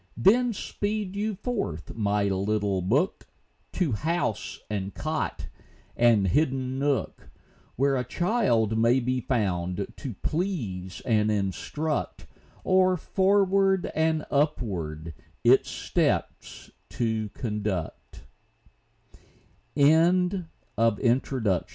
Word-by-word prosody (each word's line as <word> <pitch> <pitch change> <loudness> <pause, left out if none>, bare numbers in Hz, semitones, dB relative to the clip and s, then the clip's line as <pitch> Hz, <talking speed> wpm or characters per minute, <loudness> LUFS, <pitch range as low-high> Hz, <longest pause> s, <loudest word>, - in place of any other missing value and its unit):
Then 240 +5 +4
speed 205 -1 -3
you 210 +1 -1
forth, 200 - -4
my 105 -2 0
little 100 0 0
book, 130 - 0 0.5
To 180 -7 0
house, 150 -2 -2
and 100 -2 -3
cot, 155 +1 -3 0.5
and 115 -5 +4
hidden 130 - 0
nook, 140 -1 -1 0.5
Where 135 +2 +2
a 125 - 0
child 125 - +1
may 120 +3 +4
be 125 +1 -1
found 95 -6 -1
to 130 -8 -6
please 115 - -3
and 110 -2 +2
instruct, 110 - -2 0.4
Or 185 0 +3
forward 195 0 +2
and 160 -1 +1
upward 90 - -1 0.3
its - - +5
steps - - -2 0.2
to 110 -3 -1
conduct. 105 -7 -4
125 Hz, 90 wpm, -26 LUFS, -, 0.5 s, its